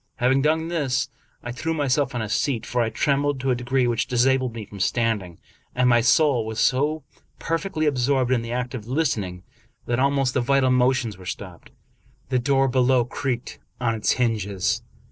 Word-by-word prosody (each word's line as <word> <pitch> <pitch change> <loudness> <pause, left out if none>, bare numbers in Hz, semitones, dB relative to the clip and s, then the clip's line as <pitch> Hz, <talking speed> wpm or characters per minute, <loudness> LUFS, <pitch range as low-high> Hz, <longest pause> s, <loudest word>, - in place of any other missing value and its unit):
Having 130 +2 +2
done 160 +2 +1
this, 135 -6 -1 0.3
I 120 - -5
threw 160 +7 -3
myself 140 -2 0
on 120 - -1
a - - -4
seat; 120 +3 -1
for 125 - -1
I 115 - +1
trembled 140 +2 0
to 130 0 0
a - - +2
degree 125 +1 0
which 120 -1 0
disabled 130 -1 +1
me 110 -2 -6
from 100 0 -11
stand 115 +2 +1
ing, 90 -3 -12 0.4
and 125 0 +3
my 120 -1 +5
soul 125 +1 +3
was 110 0 -5
so 145 +5 +1 0.3
perfectly 165 -1 -2
absorbed 130 -2 +1
in 125 -2 +2
the 115 0 -6
act 125 +1 -3
of 115 -4 -6
listening, 110 - -1 0.4
that 120 0 -1
almost 135 -1 +2
the 130 - +1
vital 130 +1 +2
motions 125 -5 +1
were 95 - -12
stopped. 90 -2 -7 0.6
The 130 -1 +2
door 135 +1 +2
below 125 -1 +3
creaked 125 -1 -4 0.2
on 120 -2 0
its 110 -2 +1
hinges. 105 -6 0
125 Hz, 185 wpm, -23 LUFS, 115-135 Hz, 0.6 s, my